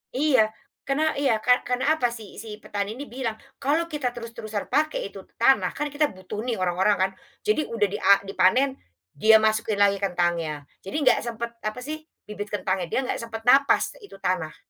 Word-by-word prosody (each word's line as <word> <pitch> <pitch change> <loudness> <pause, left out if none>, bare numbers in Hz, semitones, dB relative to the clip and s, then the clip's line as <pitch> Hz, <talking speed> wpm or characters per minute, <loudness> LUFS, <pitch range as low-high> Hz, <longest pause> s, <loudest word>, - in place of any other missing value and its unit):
Iya 265 -5 +4 0.4
karena 310 +3 +2
iya 265 -5 +3
kar 250 0 +3
karena 250 +4 +1
apa 245 - +3
si 225 -4 -9
si 215 -2 -7
petani 205 +1 -3
ini 275 - -6
bilang 240 -4 -3 0.2
kalau 315 +5 0
kita 295 -4 -1
terus-terusan 225 -3 -6
pakai 305 -9 0
itu 195 - -9 0.2
tanah 265 +3 +3
kan 295 0 -2
kita 295 +1 +2
butuh 185 +2 -7
nih 240 - 0
orang-orang 185 +2 +2
kan, 190 0 +1 0.3
jadi 425 -8 +1
udah 210 -3 +1
dia 205 - -3 0.2
dipanen 255 +8 +2 0.3
dia 220 +9 +5
masukin 220 0 +1
lagi 200 0 +3
kentangnya 175 -5 -1 0.2
jadi 195 - -6
nggak 255 -3 +5
sempet 235 0 -4 0.2
apa 215 +3 -2
sih 305 +4 -4 0.3
bibit 210 0 -6
kentangnya 190 -2 -1
dia 255 - 0
nggak 255 - -2
sempat 225 -1 -6
napas 275 +4 +4
itu 410 - -13
tanah. 175 -4 -1
225 Hz, 180 wpm, -25 LUFS, 200-270 Hz, 0.4 s, dia